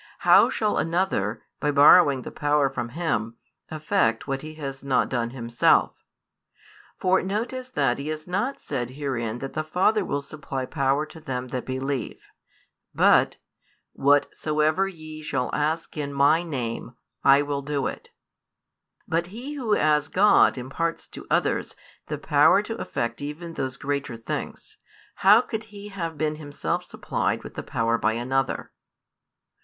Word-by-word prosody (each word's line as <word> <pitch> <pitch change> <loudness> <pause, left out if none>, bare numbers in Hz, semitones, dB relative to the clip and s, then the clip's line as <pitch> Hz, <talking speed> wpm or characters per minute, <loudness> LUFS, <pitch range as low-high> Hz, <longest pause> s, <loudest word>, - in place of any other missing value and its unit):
How - - +7
shall 210 -2 0
another, 165 - -1 0.2
by 150 - 0
borrowing 145 -1 +6
the - - -7
power 145 -2 +1
from 120 -3 -4
Him, 115 -7 -2 0.3
effect 155 - 0
what 135 -1 -2
He 155 0 -9
has 135 -3 -6
not 135 -2 +1
done 120 -2 -1
Himself? 120 -1 +2 1.0
For 185 +1 +2
notice 235 +6 -3
that 140 - 0
He 140 - -5
has 155 0 -4
not 205 +10 -2
said 125 -4 -4
herein 120 -6 -2
that 135 +2 -6
the 155 - -2
Father 190 +6 +2
will 145 -5 -2
supply 135 -2 -5
power 140 +1 0
to 160 - -13
them 130 -4 -5
that 125 0 -4
believe; 130 -1 -3 0.8
but, - - +5 0.6
|293 - - -15
Whatsoever 150 +4 +2
ye 155 -4 -9
shall 135 -4 -2
ask 155 +2 -1
in 145 -2 -3
My 140 +4 +4
Name, 125 -7 -4 0.3
I 140 +1 +6
will 145 -1 -2
do 140 0 -2
it. - - -5 1.0
But 170 +1 0
He 240 +10 -7
Who 245 -7 0
as 150 -1 +2
God 200 -5 +4
imparts 150 +7 -3
to - - -10
others - - 0 0.3
the - - -3
power - - +4
to - - -5
effect 115 +1 -3
even 155 +4 -6
those 130 -4 -3
greater 140 -4 -3
things, 115 - -6 0.4
how 205 +4 +7
could 220 -3 -5
He 205 -1 -10
have 165 -5 -5
been 155 0 -1
Himself 145 -2 -3
supplied - - -2
with - - -9
the - - -5
power 115 0 0
by 110 - +1
another?" 130 +3 -1
145 Hz, 150 wpm, -25 LUFS, 130-165 Hz, 1.0 s, How